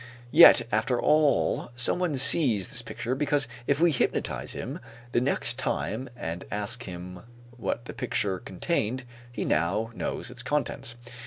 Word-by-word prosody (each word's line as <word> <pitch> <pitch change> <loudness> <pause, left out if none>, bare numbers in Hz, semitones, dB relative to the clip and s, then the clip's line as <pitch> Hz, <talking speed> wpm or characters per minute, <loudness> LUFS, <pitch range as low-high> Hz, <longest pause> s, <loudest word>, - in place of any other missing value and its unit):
Yet - - +8
after 120 +3 +1
all 150 -4 +2
someone 150 +5 +2
sees 125 - +4
this - - -1
picture, 125 - -4
because 145 -1 0 0.2
if 140 +1 +2
we 170 0 +4
hypnotize 135 - -1
him - - -6 0.3
the 120 - +2
next 125 -1 +1
time 130 0 -2
and 85 -6 -5
ask 105 +4 0
him 90 0 -8 0.4
what 120 0 -3
the - - -7
picture 105 -7 -2
contained, 130 -2 -2 0.3
he - - -4
now 95 +9 0
knows 120 - -4
its 125 -1 -4
contents. 130 -3 -2
120 Hz, 145 wpm, -27 LUFS, 105-140 Hz, 0.4 s, Yet